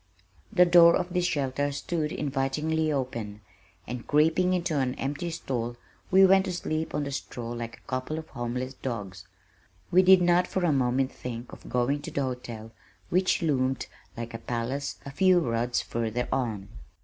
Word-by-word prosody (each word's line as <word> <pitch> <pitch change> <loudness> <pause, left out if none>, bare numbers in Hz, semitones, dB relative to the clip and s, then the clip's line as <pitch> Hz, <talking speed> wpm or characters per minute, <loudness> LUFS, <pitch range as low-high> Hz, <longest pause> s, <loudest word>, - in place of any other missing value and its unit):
The 180 -4 +6
door 170 -1 +7
of 180 -1 -2
this 180 -1 +1
shelter 145 -2 -1
stood 150 +2 -2
invitingly 150 +3 -1
open, 115 -7 -3 0.4
and 120 0 -6
creeping 160 +5 +3
into 170 -4 0
an 130 -1 0
empty 145 +6 -3
stall 120 -7 -3 0.3
we 190 +1 +7
went 190 0 +5
to - - -2
sleep 160 -2 -3
on 150 - 0
the 140 - -4
straw 120 -4 -5
like 115 -1 -5
a - - -24
couple 130 +4 -3
of 160 0 -6
homeless 125 +1 -4
dogs. 100 -9 -6 0.7
We 185 - +7
did 185 -1 +7
not 175 +1 +4
for 185 -2 -1
a 160 - +3
moment 130 0 +1
think 120 -1 -7
of - - -11
going 125 +4 +1
to - - -6
the 140 - -1
hotel 120 -4 -5 0.4
which 185 0 +2
loomed 130 -4 +1 0.3
like 115 0 -5
a 115 - -5
palace 120 +4 -3
a 140 - -6
few 185 +4 +4
rods 120 -4 0
further 115 +1 -2
on. 110 -7 -2
135 Hz, 175 wpm, -27 LUFS, 120-170 Hz, 0.7 s, door